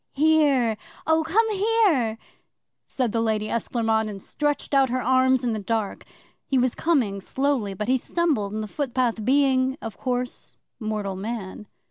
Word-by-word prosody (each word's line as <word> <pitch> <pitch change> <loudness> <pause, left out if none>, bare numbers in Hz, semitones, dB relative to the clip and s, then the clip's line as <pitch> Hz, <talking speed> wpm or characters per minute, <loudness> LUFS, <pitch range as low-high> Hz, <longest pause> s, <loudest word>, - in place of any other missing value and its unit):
'"Here, 285 -7 +3 0.3
oh, 320 0 +3
come 440 +7 +2
here!" 390 - +2 0.7
said 250 -4 -1
the 230 - 0
Lady 215 -1 0
Esclairmonde, 225 -1 0
and 200 -2 -7
stretched 295 +8 -2
out 270 -2 +4
her 255 +2 0
arms 260 +1 +3
in 240 -2 0
the 215 - -2
dark. 210 0 -3 0.4
'He 270 - +1
was 255 -1 +2
coming 240 -12 0
slowly, 260 -4 -1
but 210 +3 -4
he 260 +1 +2
stumbled 285 - 0
in 215 +1 -3
the 215 - -4
footpath, 245 -3 -1
being, 265 0 +2
of 225 -3 -8
course, 250 -1 -3 0.2
mortal 210 -3 -3
man. 210 0 -6
250 Hz, 155 wpm, -24 LUFS, 215-280 Hz, 0.7 s, out